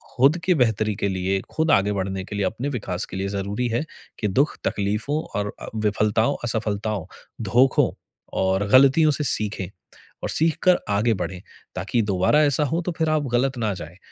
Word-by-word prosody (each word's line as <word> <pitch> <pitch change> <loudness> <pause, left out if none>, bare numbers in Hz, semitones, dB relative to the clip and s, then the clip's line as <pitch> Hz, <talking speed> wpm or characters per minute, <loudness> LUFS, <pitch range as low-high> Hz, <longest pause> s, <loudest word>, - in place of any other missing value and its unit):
खुद 135 +6 +4
की 185 - +4
बेहतरी 110 -5 +1
के 100 - -1
लिए, 95 +1 0
खुद 160 0 +1
आगे 100 +1 +3
बढ़ने 95 -1 -3
के 105 - -7
लिए, 100 -1 0
अपने 115 +9 -2
विकास 100 -9 -3
के 95 - -8
लिए, 95 +1 -2
ज़रूरी 100 +4 -2
है 120 +5 0 0.4
कि 105 - 0
दुःख, 135 +10 +1
तकलीफ़ो 105 +9 -1 0.2
और 105 0 -1
अ, - - -7
विफलताओं, 110 +4 +1
असफलताओं, 110 -4 -2 0.4
धोखों 125 +6 +3 0.5
और 95 +1 +1
गलतियों 140 +6 +6
से 150 - -1
सीखें। 105 -7 +1 0.6
और - - -2
सीख 160 0 +1
कर 180 -1 +5
आगे 105 +3 +2
बढ़ें, 90 0 -5 0.3
ताकि 95 +6 0
दोबारा 100 +8 +3
ऐसा 145 0 +2
हो, 165 +5 -1
तो 180 - -3
फिर 160 -1 +1
आप 155 -1 +1
गलत 130 +2 +1
ना 110 -3 0
जाए। 85 0 -9
110 Hz, 185 wpm, -23 LUFS, 100-135 Hz, 0.6 s, गलतियों